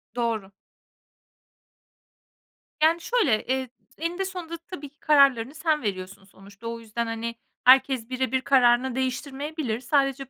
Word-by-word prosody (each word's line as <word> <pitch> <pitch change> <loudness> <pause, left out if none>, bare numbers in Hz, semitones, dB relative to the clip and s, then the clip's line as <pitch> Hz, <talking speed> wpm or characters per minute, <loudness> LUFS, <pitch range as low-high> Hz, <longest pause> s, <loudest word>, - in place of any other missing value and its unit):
Doğru. 225 -5 -2 2.3
Yani, 330 +2 +4
şöyle: 325 - +1
Eee, 260 0 -1
t 250 +5 -17
eninde 350 +3 -2
sonunda 355 -3 -6
tabii 330 -3 -9
ki 295 +3 -40
kararlarını 275 -3 +4
sen 315 -1 0
veriyorsun 195 -1 -5
sonuçta. 200 +3 -13
O 230 0 -5
yüzden, 230 +1 -4
hani, 230 +1 -4 0.3
herkes 260 -2 +5
birebir 260 0 -1
kararını 250 -1 +3
değiştirmeyebilir. 265 -1 -3
Sadece 275 0 0
260 Hz, 120 wpm, -25 LUFS, 230-295 Hz, 2.3 s, herkes